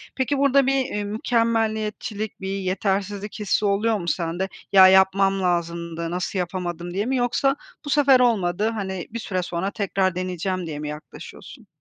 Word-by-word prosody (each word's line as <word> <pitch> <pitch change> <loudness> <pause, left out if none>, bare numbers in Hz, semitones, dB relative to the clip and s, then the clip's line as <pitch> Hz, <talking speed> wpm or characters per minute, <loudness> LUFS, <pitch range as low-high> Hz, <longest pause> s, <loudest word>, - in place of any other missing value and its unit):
Peki 270 +2 0
burda 275 -1 +4
bir, 270 - +3
eee, 210 -5 -3
mükemmeliyetçilik, 220 -1 -1
bir 190 - -4
yetersizlik 195 +2 -2
hissi 210 0 0
oluyor 210 +2 +2
mu 170 -3 -6
sende? 175 +3 -1 0.2
"Ya, 190 -1 +9
yapmam 195 +1 +4
lazımdı 170 -1 -2
nasıl 180 +2 -2
yapamadım!" 175 -1 -4
diye 200 +3 -1
mi 265 - 0
yoksa 250 +3 +1 0.3
"Bu - - -5
sefer 275 -3 +5
olmadı.", 210 -4 +2
hani, 190 -4 -4
"Bir 235 +1 -5
süre 185 -5 -2
sonra 180 +3 -3
tekrar 190 -3 0
deneyeceğim." 185 0 -3
diye 150 -2 -5
mi 150 0 -4
yaklaşıyorsun? 150 0 -11
195 Hz, 160 wpm, -23 LUFS, 180-220 Hz, 0.3 s, Ya